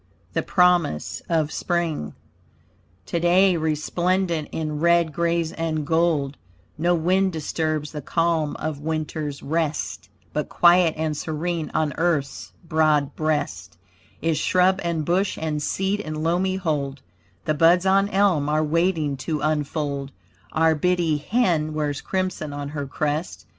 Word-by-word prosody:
THE - - +1
PROMISE 170 - +2
OF 160 -3 +1
SPRING 165 - -2 0.9
Today 175 +2 +3
resplendent 170 +2 0
in 155 -2 -3
red, 170 -1 +3
grays 170 0 0
and 160 -2 -2
gold, 160 -4 +1 0.4
No 175 +3 +2
wind 185 +3 +2
disturbs 155 -1 -2
the 150 - -6
calm 165 0 0
of 155 -2 -4
Winter's 155 -1 -3
rest, 155 0 -2 0.2
But - - -2
quiet 175 -1 +5
and 155 -1 -1
serene 160 +2 -3
on 155 -2 +1
earth's 155 -5 -1 0.2
broad 155 -3 +2
breast 155 -1 -2 0.5
Is 160 -2 +1
shrub 185 +3 +3
and 165 -3 -1
bush 185 +4 +1
and 155 -2 -2
seed 195 +6 -1
in 155 -5 -4
loamy 180 +3 +1
hold; 145 -7 -2 0.4
The 155 - +1
buds 170 +4 +4
on 195 +1 +3
elm 190 -8 +2
are 155 +1 +2
waiting 160 -2 +1
to 150 +2 -3
unfold, 145 -2 -2 0.4
Our 160 0 +3
biddie 170 -1 +1
hen 155 -4 +1
wears 150 -2 -2
crimson 185 -6 -2
on 145 0 -5
her 145 -2 -4
crest. 150 +4 -3
160 Hz, 130 wpm, -23 LUFS, 150-175 Hz, 0.9 s, quiet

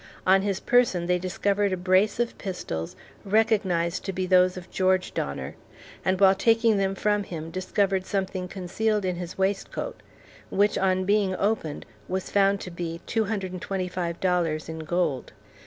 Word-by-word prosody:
On 190 +1 +5
his 195 -1 -1
person 240 -9 +2
they 180 0 +1
discovered 200 +2 0
a 185 - 0
brace 185 +4 +2
of 240 -1 0
pistols 80 - -5 0.3
recognized 195 -5 +1
to 195 - -1
be 185 0 -2
those 185 0 +4
of 180 - -10
George 185 -1 +1
Donner; 70 -1 -4 0.5
and 185 -1 +1
while 195 -1 +7
taking 225 +2 +3
them 195 0 0
from 210 +1 +1
him, 165 -4 -6
discovered 190 +1 0
something 190 -2 -2
concealed 200 +3 -1
in 180 -1 -1
his 175 -1 -6
waistcoat, 195 - -2 0.5
which 205 +1 +2
on 185 -1 +1
being 200 -1 +2
opened 195 -8 -1 0.2
was 185 0 -3
found 200 0 +3
to 180 - -7
be 170 -1 -5
$225.00 180 -5 -1
in 160 0 -5
gold. 160 -6 -1
185 Hz, 150 wpm, -26 LUFS, 180-200 Hz, 0.5 s, while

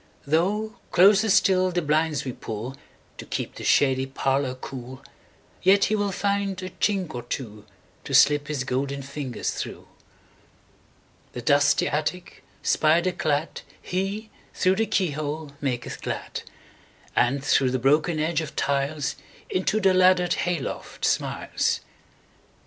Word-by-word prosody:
Though 200 +9 0
closer 200 +4 +5
still 185 -1 +4
the 175 -1 -1
blinds 155 0 +1
we 130 - -3
pullTo 115 +6 -9
keep - - -3
the - - -9
shady 135 -1 +3
parlour 135 0 0
cool, 130 0 -9 0.6
Yet 195 +2 +5
he 215 - +1
will 205 -1 0
find 200 0 -1
a 185 - -5
chink 190 -6 -1
or 120 - -4
twoTo 110 -4 -6 0.5
slip 145 0 +5
his 145 -4 -2
golden 140 +2 -2
fingers 135 -2 -4
through. - - -6 1.5
The 120 - -6
dusty 145 +2 +3
attic 155 +4 -3 0.2
spider 170 +4 +3
cladHe, 185 +7 -3 0.3
through 185 +1 +3
the 225 - +1
keyhole, 155 -3 -2
maketh 125 -4 -3
glad; - - -4 0.7
And 135 +3 +2
through 135 -2 +3
the 130 - 0
broken 150 +6 +2
edge 160 +1 0
of 155 -1 -7
tiles, 140 +1 -1 0.3
Into 190 +3 +1
the 190 -2 +4
laddered 185 -1 +4
hay 175 -1 0
loft - - -5
smiles. - - 0
155 Hz, 125 wpm, -25 LUFS, 135-185 Hz, 1.5 s, closer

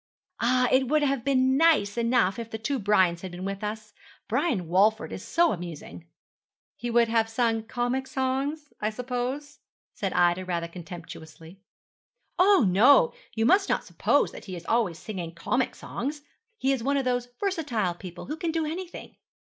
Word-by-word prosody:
'Ah, 250 +2 +3
it 260 0 +3
would 300 +2 +2
have 275 -4 0
been 260 -1 +3
nice 305 -11 +4
enough 235 -4 +2
if 230 -1 -6
the 220 - -5
two 260 +5 -2
Brians 190 -5 +2
had 190 - -6
been 180 +1 -6
with 195 +1 -4
us. 215 0 -5 0.3
Brian 245 - 0
Walford 205 +6 +2
is - - -6
so 340 0 +2
amusing.' 160 - -8 0.7
'He 240 - -5
would 235 0 +4
have 225 0 +1
sung 225 -1 +1
comic 245 +3 -2
songs, 270 +3 -2
I 210 - +1
suppose?' 250 +5 -4 0.3
said 195 -4 -3
Ida 175 +1 +3
rather 170 -2 -2
contemptuously. 170 0 -11 0.8
'Oh, 380 - +6
no; 255 - +5 0.2
you 225 0 +1
must 390 - +4
not - - +1
suppose - - +1
that - - -11
he 185 - -6
is 170 - -9
always 220 -8 +1
singing 175 -4 -6
comic 255 +9 -1
songs. 290 +3 -5 0.3
He 270 -9 +1
is 260 - -2
one 280 +4 +1
of 270 - -1
those 245 -1 0
versatile 290 - -1
people 175 0 -9
who 305 - -5
can 335 - -2
do 325 -1 0
anything.' 345 +3 -7
235 Hz, 170 wpm, -27 LUFS, 190-270 Hz, 0.8 s, Oh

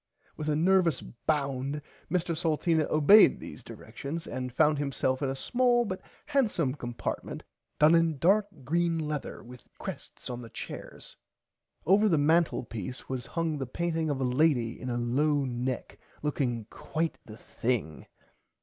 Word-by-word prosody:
With 155 0 -3
a 150 - +2
nervous 170 -2 +3
bound 140 +1 -2 0.3
Mr 175 0 0
Salteena 160 -1 +1
obeyd 155 +8 +7
these - - -9
directions 140 +9 -7
and 125 -1 -4
found 150 +3 +3
himself 130 -1 0
in 140 - 0
a 135 - -2
small 240 - +2
but 185 -3 -4 0.2
handsome 200 - +1
compartment 120 -4 -5 0.3
done 150 +2 +6
in 165 -2 +3
dark 200 +7 +4 0.2
green 170 +4 +1
lether 150 -2 -4
with 125 +1 -13
crests - - -6
on 125 0 -5
the 115 - -10
chairs. - - -8 0.7
Over 205 +5 +5
the 165 - +3
mantlepiece 145 - 0
was 130 -2 -3
hung 165 -3 -1
the 135 - -3
painting 165 +3 -1
of 140 -2 -1
a - - 0
lady 125 -3 +2
in 130 - -4
a 120 - -1
low 140 +4 +1
neck 125 0 -3 0.2
looking 125 -6 -1
quite 160 +1 -3
the 110 -3 -11
thing. 115 -13 -3
150 Hz, 150 wpm, -29 LUFS, 125-165 Hz, 0.7 s, obeyd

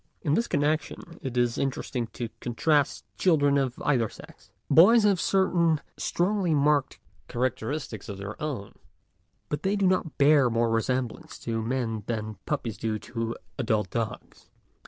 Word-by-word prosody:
In 150 -4 +1
this 230 +8 +2
connection 155 +3 -1
it 125 -2 -4
is 120 -1 +1
interesting 130 -3 -2
to 120 -2 -4
contrast 145 +4 +1
children 145 -6 +4
of 130 -2 -2
either 120 -7 +2
sex. - - -15 0.2
Boys 215 +7 +7
have 200 -4 +3
certain 170 -5 +2 0.2
strongly 180 -2 0
marked 145 -2 +2 0.3
characteristics 130 -2 -3
of 100 - -5
their 100 +2 -7
own, 135 -10 -4 0.7
but 150 0 -3
they 195 +4 +1
do 200 -1 +1
not 180 -4 +1
bear 140 -2 +5
more 115 0 +1
re 115 0 +2
semblance 125 -1 -3
to 115 -1 -2
men 115 -2 -2
than 110 -3 -4
puppies 120 -8 -2
do 110 -1 -1
to 115 +1 -4 0.2
adult 110 -6 0
dogs. 115 -1 -5
130 Hz, 150 wpm, -27 LUFS, 115-155 Hz, 0.7 s, Boys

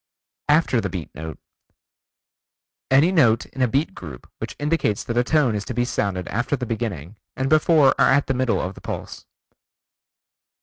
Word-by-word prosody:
After 150 -6 +3
the 100 - -3
Beat 90 -5 -6
Note: 80 +1 -7 1.5
Any 140 +7 +5
note 125 -11 +3
in 130 - -8
a 125 - +4
beat 140 +7 0
group 75 -8 -10
which - - -6
indicates 145 -8 0
that 115 - -4
a 120 - +3
tone 140 -3 +2
is 105 -1 -2
to 125 - -5
be 120 0 +1
sounded 100 -6 -2
after 120 +6 -1
the 125 - -4
beginning, 110 -6 -4 0.2
and 130 0 -1
before 155 -2 +5
or - - +6
at 140 +1 +3
the 135 - -1
middle 130 -2 0
of 95 - -3
the - - -14
pulse. - - -7
120 Hz, 175 wpm, -22 LUFS, 100-140 Hz, 1.5 s, or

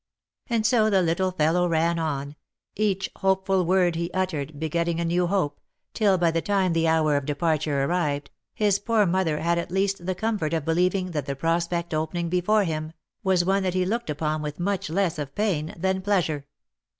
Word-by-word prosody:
And 230 -2 +1
so 220 -1 +4
the 195 -3 +3
little 175 +3 +1
fellow 180 0 +2
ran 165 0 +1
on 145 -2 -3 0.2
— - - -57
each 195 -2 0
hopeful 190 0 +1
word 180 -2 +3
he 170 +1 -2
uttered 155 -6 -2
be 160 - -1
getting 170 +1 -1
a 170 - 0
new 175 +1 +1
hope, 175 -6 -1 0.3
till, 200 -4 +3
by 170 -2 +2
the 165 0 0
time 190 -3 +1
the 165 0 +2
hour 160 -2 +3
of 140 - -4
departure 150 -2 0
arrived, 150 -3 -1 0.2
his 205 -2 +2
poor 220 -1 +2
mother 175 -4 +1
had 170 +1 +1
at 170 - -4
least 190 -1 -1
the 185 - 0
comfort 205 -7 -1
of 160 -3 -2
believing 180 +3 +1
that 150 -4 -3
the 140 - -2
prospect 170 +3 -1
opening 160 +2 -1
before 180 +5 +2
him, 155 -2 -3 0.3
was 185 -2 +2
one 195 +1 +2
that 185 -1 -1
he 185 0 +2
looked 230 0 -2
upon 155 +1 -1
with 150 +1 -5
much 195 -1 -1
less 175 -1 0
of 140 -2 -5
pain 180 -8 0
than 190 +2 0
pleasure. 170 -8 0
175 Hz, 200 wpm, -25 LUFS, 160-190 Hz, 0.3 s, so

